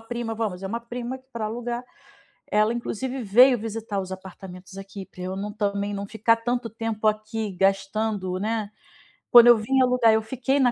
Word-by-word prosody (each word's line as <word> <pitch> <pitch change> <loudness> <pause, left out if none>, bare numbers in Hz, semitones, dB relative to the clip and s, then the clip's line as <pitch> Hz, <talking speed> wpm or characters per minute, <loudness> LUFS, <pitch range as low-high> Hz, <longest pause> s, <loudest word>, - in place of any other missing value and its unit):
prima, 225 0 -4
vamos, 205 -5 -3
é - - -3
uma 230 +4 -3
prima 240 +2 -6
que 260 - -27
pra 230 -2 -3
alugar, 240 +2 -4 0.7
ela 215 +2 +3
inclusive 250 +2 -4
veio 245 +4 +6
visitar 220 -2 -4
os 190 -1 -7
apartamentos 190 0 -10
aqui 195 0 -8
pra 185 - -15
eu 185 +1 -4
não 205 +1 -4
também, 205 -1 -1
não 200 0 -4
ficar 225 +2 +2
tanto 240 0 -2
tempo 225 -1 -3
aqui 215 0 -1
gastando, 195 0 0
né. 215 +1 -2 0.6
Quando 240 0 +9
eu 240 -1 +8
vim 260 +5 +1
alugar, 250 -3 +4
eu 220 - +3
fiquei 260 +5 -1
na 250 -2 +4
220 Hz, 185 wpm, -25 LUFS, 200-240 Hz, 0.7 s, Quando